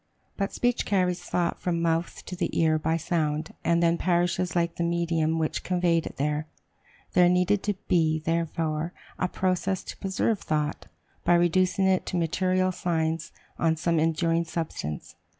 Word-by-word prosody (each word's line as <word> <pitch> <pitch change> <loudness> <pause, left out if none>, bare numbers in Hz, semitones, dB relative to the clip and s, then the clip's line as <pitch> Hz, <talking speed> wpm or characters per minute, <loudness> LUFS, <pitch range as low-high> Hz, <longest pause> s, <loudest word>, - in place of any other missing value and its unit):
But 195 0 -2
speech 245 0 0
carries 180 -3 +1
thought 175 -1 -1
from 175 -2 -1
the 170 - -1
mouth 165 0 -1
to 180 - -6
the 175 -2 -1
ear 160 -1 +3
by 160 +1 0
sound, 155 -2 -1
and 170 0 +2
then 170 0 +3
perishes 175 0 +1
like 170 -1 +1
the 170 - 0
medium 170 -2 +1
which 160 -1 -1
conveyed 175 -2 +1
it - - -9
there. 150 +2 -1 0.7
There 180 -1 +6
needed 180 +3 +2
to 205 -1 -1
be, 160 -3 +3
therefore, 165 0 -1 0.3
a 185 - +1
process 185 +1 -1
to - - -8
preserve 195 +2 0
thought, 150 -1 -2 0.4
by 175 - +4
reducing 180 +2 +3
it 190 -1 +2
to 180 - -1
material 185 +2 +1
signs 165 -2 -1 0.3
on 160 -1 +2
some 170 0 +1
enduring 165 +1 +1
substance. 160 - -4
170 Hz, 165 wpm, -27 LUFS, 160-180 Hz, 0.7 s, There